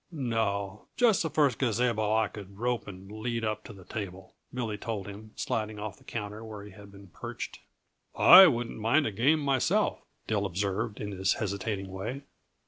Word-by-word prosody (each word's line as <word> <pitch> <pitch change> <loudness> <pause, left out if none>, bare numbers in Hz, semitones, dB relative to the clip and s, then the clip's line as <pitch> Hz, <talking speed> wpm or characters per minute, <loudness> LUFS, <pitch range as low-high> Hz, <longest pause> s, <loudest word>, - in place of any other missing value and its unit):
"No 110 - -2
just 235 -6 +4
the 160 - -1
first 145 -5 +2
gazabo 115 -3 +1
I 110 -1 +3
could 100 -2 -11
rope 120 +1 -1
and 95 0 -10
lead 115 +1 -3
up 110 0 -2
to - - -9
the 95 -3 -13
table," 95 -3 -6 0.2
Billy 115 -4 -3
told 105 -2 -4
him, 105 +2 -9
sliding 110 -1 -2
off 105 0 -6
the - - -21
counter 105 0 -5
where 105 -2 -8
he 105 - -11
had 100 +1 -13
been 100 -1 -14
perched. - - -7 0.6
"I 185 +2 +10
wouldn't 120 -6 -1
mind 125 +8 +3
a - - -1
game 135 +10 +3
myself," 135 -3 +1 0.2
Dill 105 -2 0
observed, 100 +4 -2
in 105 - -4
his 95 0 +1
hesitating 100 -1 -3
way. 110 +9 -5
110 Hz, 180 wpm, -29 LUFS, 100-120 Hz, 0.6 s, I